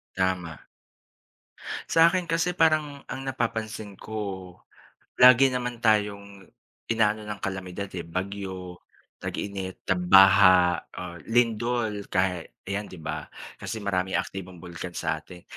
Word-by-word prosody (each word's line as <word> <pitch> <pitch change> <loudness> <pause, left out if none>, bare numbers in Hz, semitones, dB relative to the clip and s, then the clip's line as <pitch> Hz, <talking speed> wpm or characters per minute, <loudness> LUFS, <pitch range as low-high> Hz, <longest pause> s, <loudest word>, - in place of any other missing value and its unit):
Tama. 90 -4 -1 1.3
Sa'kin 170 +2 +5
kasi 170 +2 0
parang 155 -3 +2
ang 135 - -6
napapansin 110 -6 -4
ko, 95 -5 -6 0.6
lagi 125 +2 +8
naman 125 -2 -3
tayong 100 -3 0 0.4
inaano 110 -2 +1
ng 105 -2 -6
kalamidad, 95 +1 -4
eh, 85 - -5
bagyo, 95 0 -5 0.4
tag-init, 95 -2 -5
tag-baha, 90 -1 +6 0.2
ah, 90 -1 -7
lindol 115 -2 0
kaya 90 -2 +1 0.2
ayan 100 +1 -2
'di 90 - -11
ba? 80 - -4 0.3
Kasi 110 - -5
maraming 95 -2 -1
aktibong 90 -3 -9
bulkan 90 0 -7
sa 80 -2 -1
atin. 90 +3 -13
100 Hz, 110 wpm, -26 LUFS, 90-115 Hz, 1.3 s, lagi